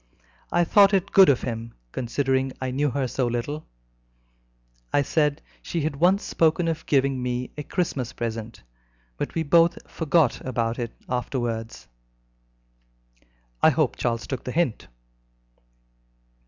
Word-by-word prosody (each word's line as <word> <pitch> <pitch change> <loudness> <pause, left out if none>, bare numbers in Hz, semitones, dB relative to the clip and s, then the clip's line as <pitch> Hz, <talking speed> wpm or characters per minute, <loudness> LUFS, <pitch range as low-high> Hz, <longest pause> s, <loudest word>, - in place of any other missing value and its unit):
I 175 - +3
thought 200 +3 +5
it 190 0 0
good 195 -4 +7
of 135 - +2
him, 115 -1 -5 0.2
considering 130 +1 -1
I 130 -1 -3
knew 145 +3 +1
her 135 0 -1
so 125 0 -1
little. 120 +6 -3 1.2
I 145 - +3
said 150 0 +1
that - - -24 0.2
she 170 - -3
had 145 -1 -2
once 185 +6 +3
spoken 165 +1 +2
of 165 -1 -3
giving 135 -2 +2
me 125 0 -3
a 150 - -5
Christmas 140 -6 -2
present, 115 -1 -5 0.5
but - - -4
we 165 - +1
both 165 +3 +4
forgot 160 -4 +1
about 115 -2 -2
it 120 -1 -3 0.2
afterwards." 120 -3 -3 1.7
"I - - +7
hope - - +1
Charles 115 -1 -2
took 130 - -5
the 125 - -4
hint." 165 -7 -1
135 Hz, 140 wpm, -25 LUFS, 120-160 Hz, 1.7 s, good